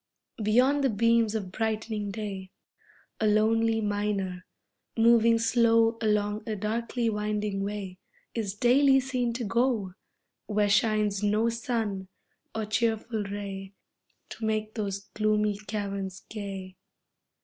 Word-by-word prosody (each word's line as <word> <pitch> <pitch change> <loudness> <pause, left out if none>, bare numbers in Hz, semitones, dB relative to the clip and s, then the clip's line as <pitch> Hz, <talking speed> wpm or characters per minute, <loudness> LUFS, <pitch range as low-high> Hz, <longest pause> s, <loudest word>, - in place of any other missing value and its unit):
Beyond 255 +7 +3
the 270 - +3
beams 230 0 +2
of 195 -4 -3
brightening 220 0 -2
day 195 -2 -5 0.7
A 220 - +2
lonely 225 +1 +3
miner, 205 -3 -2 0.5
moving 230 0 +5
slow 230 0 +3
Along 210 -1 +1
a 215 - -1
darkly 230 +3 -2
winding 210 -2 -1
way, 200 -2 -5 0.3
Is 210 -4 -3
daily 270 +4 +5
seen 255 -2 -1
to 240 +1 -3
go, 225 -3 0 0.5
Where 210 -1 +1
shines 210 -1 +2
no 210 +2 +2
sun 225 -5 -2 0.5
or 220 -1 -1
cheerful 220 0 -1
ray 195 -1 -6 0.5
To 225 - -9
make 215 0 -1
those 200 -3 -3
gloomy 210 -1 +1
caverns 195 -2 -4
gay. 195 -3 -7
215 Hz, 115 wpm, -28 LUFS, 205-230 Hz, 0.7 s, moving